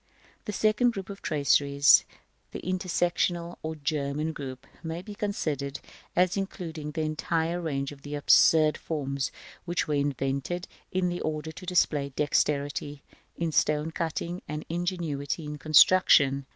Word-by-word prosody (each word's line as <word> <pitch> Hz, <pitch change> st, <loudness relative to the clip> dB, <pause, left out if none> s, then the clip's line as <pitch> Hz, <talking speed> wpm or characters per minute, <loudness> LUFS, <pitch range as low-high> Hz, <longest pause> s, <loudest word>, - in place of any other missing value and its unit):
§ -, -, -42 dB, 0.4 s
XV. -, -, -40 dB
The -, -, -3 dB
second 215 Hz, +4 st, +3 dB
group 195 Hz, -1 st, -6 dB
of 195 Hz, -, -10 dB
traceries, 140 Hz, -2 st, +4 dB, 0.5 s
the -, -, -5 dB
intersectional 175 Hz, -1 st, -1 dB
or 160 Hz, 0 st, -4 dB
German 150 Hz, +1 st, -2 dB
group, 130 Hz, -3 st, -7 dB, 0.2 s
may 165 Hz, +1 st, -5 dB
be 210 Hz, -, -8 dB
considered 155 Hz, -, -3 dB, 0.4 s
as 180 Hz, +1 st, +3 dB
including 165 Hz, -6 st, -4 dB
the 155 Hz, +1 st, -3 dB
entire 165 Hz, +2 st, -1 dB
range 140 Hz, -4 st, -2 dB
of 140 Hz, -1 st, -12 dB
the 145 Hz, +1 st, -6 dB
absurd 155 Hz, +1 st, +5 dB
forms 140 Hz, -4 st, -3 dB, 0.3 s
which 175 Hz, -1 st, -1 dB
were 150 Hz, -, -1 dB
invented 140 Hz, +4 st, -1 dB, 0.2 s
in 180 Hz, -1 st, -1 dB
order 155 Hz, 0 st, -3 dB
to 185 Hz, +4 st, -11 dB
display 150 Hz, -5 st, +2 dB
dexterity 145 Hz, -1 st, 0 dB, 0.3 s
in 170 Hz, -1 st, -1 dB
stone 150 Hz, +1 st, +1 dB
cutting 170 Hz, +2 st, -3 dB
and 150 Hz, +1 st, -5 dB
ingenuity 170 Hz, -4 st, -2 dB
in 150 Hz, 0 st, -6 dB
construction. 145 Hz, -3 st, +5 dB
155 Hz, 140 wpm, -28 LUFS, 145-175 Hz, 0.5 s, absurd